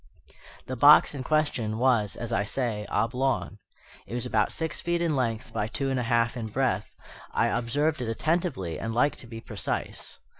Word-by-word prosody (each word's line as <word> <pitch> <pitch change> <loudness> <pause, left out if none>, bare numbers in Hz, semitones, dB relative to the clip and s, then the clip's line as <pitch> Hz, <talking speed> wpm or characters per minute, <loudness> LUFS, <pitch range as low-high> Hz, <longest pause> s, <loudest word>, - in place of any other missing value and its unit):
The 130 - -4
box 145 +5 +7
in 140 - -5
question 130 -7 0
was, 120 -5 +2
as 120 -1 -4
I 100 - +2
say, 110 -2 -2
oblong. 125 -3 0 0.5
It 120 - -5
was 120 - -2
about 105 -2 +1
six 160 -1 -2
feet 170 0 0
in 170 -3 +1
length 115 -1 -2
by 105 - -1
two 135 +4 -2
and 130 - 0
a 120 -1 -2
half 115 0 +2
in 115 -3 -4
breadth: 110 -3 -1 0.4
I - - +3
observed 140 +5 0
it 120 - -2
attentively 140 - -1
and 115 0 -4
like 145 +5 +3
to 120 - -10
be 115 -1 -8
precise. - - -5
120 Hz, 185 wpm, -27 LUFS, 115-140 Hz, 0.5 s, box